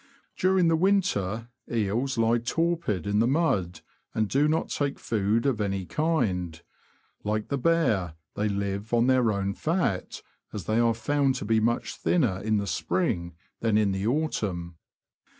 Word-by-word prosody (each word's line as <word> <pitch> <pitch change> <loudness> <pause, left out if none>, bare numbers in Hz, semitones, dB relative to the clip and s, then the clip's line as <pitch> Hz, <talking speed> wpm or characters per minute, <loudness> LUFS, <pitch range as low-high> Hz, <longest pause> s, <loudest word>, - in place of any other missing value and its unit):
During 185 -1 +3
the 165 - +4
winter, 120 - +1 0.2
eels 115 +4 0
lie 115 +1 +3
torpid 165 - -1
in 100 +1 +1
the 115 - +3
mud, 105 - 0 0.3
and 110 -1 +1
do 140 +7 +2
not 160 +1 0
take 140 -1 -1
food 110 +2 0
of 125 -6 +1
any 95 -2 -1
kind; 90 - -1 0.6
like 105 0 -2
the 140 - 0
bear, 110 - +1 0.2
they 105 +1 -1
live 100 +2 -2
on 120 0 +3
their 130 -3 +3
own 100 -1 -1
fat, 160 - -1 0.3
as 105 - -4
they 110 +1 +1
are 115 -1 +3
found 140 +2 +1
to 125 - -4
be 110 +1 +3
much 115 +1 0
thinner 115 - +1
in 110 0 +1
the 100 - -1
spring 90 - -1 0.2
than 110 -2 +2
in 105 -2 +2
the 95 +2 -2
autumn. 100 - -2
115 Hz, 160 wpm, -27 LUFS, 100-140 Hz, 0.6 s, the